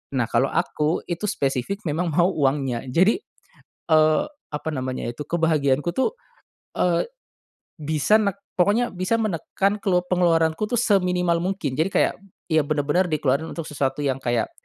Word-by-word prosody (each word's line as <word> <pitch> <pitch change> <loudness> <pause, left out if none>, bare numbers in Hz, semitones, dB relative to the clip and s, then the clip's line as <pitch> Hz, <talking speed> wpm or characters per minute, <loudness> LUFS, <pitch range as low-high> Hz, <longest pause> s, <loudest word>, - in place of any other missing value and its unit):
Nah, 120 - +2
kalo 120 +4 +1
aku 160 -1 -1
itu 175 +4 -3
spesifik 140 - -2
memang 165 +2 -1
mau 170 +4 +2
uangnya 135 -5 0
jadi, 185 - +3 0.7
eee, 155 -1 +4 0.3
apa 150 +2 -5
namanya 130 -2 -3
itu 120 +5 -5
kebahagiaanku 160 -1 +1
tuh, 265 - +1 0.7
eee, 175 -2 +2 0.7
bisa 155 +7 +2
nek 200 -2 -1 0.2
pokoknya 215 +7 +3
bisa 185 +4 -1
menekan 200 +2 -1
kelup 180 -3 0
pengeluaranku 165 +1 +2
tuh 240 - -1
seminimal 180 -6 +2
mungkin 180 -6 -2
jadi 165 +4 +2
kayak, - - +3 0.4
ya 160 -1 +4
benar-benar 155 +4 +1
dikeluarin 150 -1 0
untuk 165 - -5
sesuatu 140 0 -1
yang 135 -2 0
kayak, 120 -3 -1
165 Hz, 145 wpm, -23 LUFS, 145-185 Hz, 0.7 s, eee